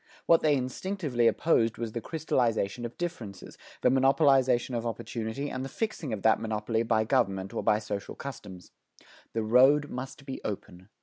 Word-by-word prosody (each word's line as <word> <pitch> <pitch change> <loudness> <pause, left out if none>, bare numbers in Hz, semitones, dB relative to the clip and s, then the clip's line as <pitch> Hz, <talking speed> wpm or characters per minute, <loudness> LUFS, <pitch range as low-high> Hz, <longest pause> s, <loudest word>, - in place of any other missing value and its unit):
What 165 - +5
they 150 -2 +3
instinctively 130 -1 -1
opposed 115 -6 +2
was 115 -2 -4
the 115 - -4
crystallization 120 -8 -1
of 120 - -7
differences, 120 - -6 0.3
the - - +4
monopolization 130 -2 +3
of 115 - -2
opportunity 115 +3 -4
and 130 - -4
the 135 - -5
fixing 215 - -3
of 105 -3 -4
that 110 - +4
monopoly 110 0 -1
by 115 -1 +2
government 100 -6 0
or - - -2
by 105 - +3
social 105 -2 -5
customs. 95 -10 -9 0.6
The 115 - -1
road 135 +6 +5
must 135 +2 -7
be 135 - -6
open. 95 -2 -6
120 Hz, 165 wpm, -28 LUFS, 110-135 Hz, 0.6 s, What